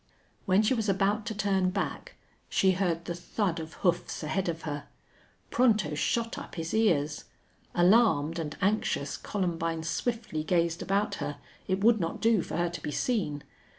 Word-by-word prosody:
When 195 +3 +4
she 220 - +3
was 220 -4 0
about 205 +3 +1
to 220 - -3
turn 195 -3 +1
back 195 +2 -4 0.3
she 190 - +3
heard 175 -3 0
the 175 - -3
thud 175 0 -2
of 160 0 -7
hoofs 175 -2 0
ahead 180 +4 -1
of 165 -1 -4
her. 145 -2 -4 0.6
Pronto 215 -10 +3
shot 230 +10 -1
up - - -9
his 165 -1 -4
ears. 155 -10 +2 0.5
Alarmed 175 -4 +4
and 150 -2 -4
anxious, 195 -8 0
Columbine 165 -4 -2
swiftly 215 -1 -2
gazed 170 +1 +1
about 200 +1 0
her. 145 - -3 0.3
It 190 +1 0
would 225 0 +5
not 165 -2 -2
do 225 -4 +3
for - - -4
her 175 0 +1
to 170 -2 -7
be - - -4
seen. 150 - -1
180 Hz, 165 wpm, -29 LUFS, 165-210 Hz, 0.6 s, would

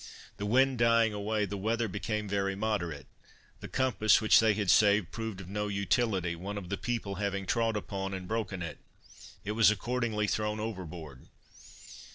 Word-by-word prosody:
The 105 - -3
wind 130 +2 +3
dying 115 -1 +4
away, 105 +1 -1
the 100 0 -5
weather 115 +3 0
became 105 +2 -3
very 100 -1 -1
moderate. 95 -8 -2 0.5
The - - -7
compass 120 -5 +3
which 110 - +6
they 110 -2 +3
had 100 -3 +2
saved 100 -3 +4
proved 110 -4 -5
of 95 - -9
no 105 +2 -2
utility, 100 -3 0
one 100 +5 -5
of 90 -4 -7
the 100 - -1
people 105 -3 -3
having 100 -1 -2
trod 115 0 +1
upon, 95 -1 -4
and 90 -1 -7
broken 105 -4 -3
it; 75 -4 -6 0.7
it 105 - -2
was 110 -1 +5
accordingly 110 0 -1
thrown 105 0 -1
overboard. 85 - -7
105 Hz, 170 wpm, -30 LUFS, 95-110 Hz, 0.7 s, which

